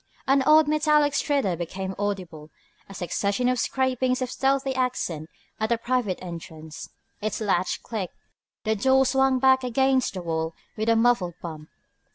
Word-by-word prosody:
An 270 0 +4
odd 310 0 +6
metallic 300 -1 +3
stridor 275 - +1
became 190 +3 -5
audible, 180 -7 -4 0.4
a - - -9
succession 200 +6 -1
of 250 -1 +1
scrapings 255 0 0
of 250 - -4
stealthy 270 0 +1
accent 215 -12 -2 0.3
at 220 0 0
the 235 - +2
private 235 -5 -1
entrance. 160 -3 -8 0.3
Its 215 +1 -2
latch 185 -4 0
clicked. 205 -6 -5 0.5
The 220 -1 +1
door 265 +5 +3
swung 265 0 +3
back 260 0 +4
against 260 -1 +1
the 185 - -5
wall 160 -1 -2 0.2
with 220 +1 -1
a 230 - +5
muffled 225 -7 +2
bump. 155 -3 -7
230 Hz, 155 wpm, -25 LUFS, 180-265 Hz, 0.5 s, odd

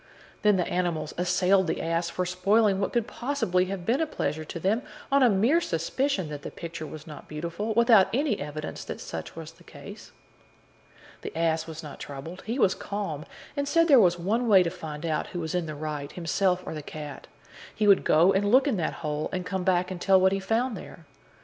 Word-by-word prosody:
Then 210 -1 +4
the 180 - +1
animals 170 -4 -2
assailed 180 +1 +2
the - - -1
ass 165 +1 -1
for 180 +2 -2
spoiling 195 +3 +2
what - - -1
could 235 -3 +1
possibly 235 -10 0
have 185 -2 -5
been 250 - +2
a 320 - +1
pleasure 155 - -3
to 165 +2 -7
them, 200 +8 +1 0.3
on 280 0 +4
a 250 - +6
mere 230 - +3
suspicion 190 - -1
that 145 -1 -6
the - - -6
picture 165 -2 -7
was 155 0 -9
not 150 -3 -10
beautiful, 170 +8 -4
without 230 -4 +6
any 260 -3 0
evidence 150 +1 -6
that - - -6
such 80 - -7
was 165 -1 -8
the 170 +1 -21
case. 175 +8 -11 1.1
The - - -7
ass 165 -1 +1
was 160 0 -8
not 150 - -9
troubled; 145 +6 -8
he 230 +4 -2
was 195 -8 +4
calm, 195 -8 -5 0.3
and 285 -1 -1
said 330 +2 +3
there 275 -5 +7
was 175 -4 +4
one 220 +8 0
way 195 -4 +7
to 170 - -2
find 160 -3 -7
out 155 -2 -1
who 175 - -5
was 160 -2 -4
in 175 -2 -1
the 155 - -5
right, 150 -1 -5
himself 180 +2 0
or - - -5
the 155 - -5
cat: 150 -1 -8 0.5
he 215 - +1
would 200 -1 +6
go 170 +5 +5
and 205 +1 +1
look 260 +3 +5
in 250 -8 +1
that 165 - -1
hole, 150 0 -2
and 185 -1 -3
come 190 0 -2
back 180 0 +1
and 180 -1 -6
tell 190 -1 +5
what 190 0 +4
he 195 - 0
found 225 +5 0
there. 170 -3 -11
180 Hz, 220 wpm, -27 LUFS, 160-210 Hz, 1.1 s, there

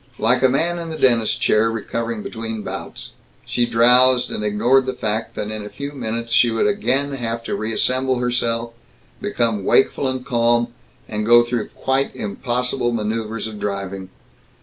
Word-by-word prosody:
Like 125 +3 +2
a 130 - +5
man 170 +6 0
in 165 -1 -6
the 160 - -5
dentist's 120 -5 +3
chair, 110 +1 +2
recovering 115 0 -3
between 110 -1 -5
bouts, - - -7 0.3
she 120 -1 0
drowsed 125 +2 +5
and 105 - -3
ignored 120 +6 +2
the 130 - -2
fact 110 +1 -3
that 105 0 -4
in 110 -1 -5
a 105 - -7
few 140 +4 -6
minutes 115 -3 -4
she 120 - +5
would 115 - 0
again 140 -9 +1
have 115 -3 -4
to - - -3
reassemble 130 +4 0
herself, 120 -1 -1 0.5
become 115 - 0
wakeful 135 +5 +2
and 130 -1 -3
calm, 120 -1 +2 0.4
and 105 -1 -3
go 120 +2 +6
through 120 -2 -2
quite 135 +1 -1
impossible 120 +3 -1
maneuvers 110 0 -3
of 110 -2 -6
driving. 100 -2 -4
115 Hz, 165 wpm, -20 LUFS, 110-130 Hz, 0.5 s, go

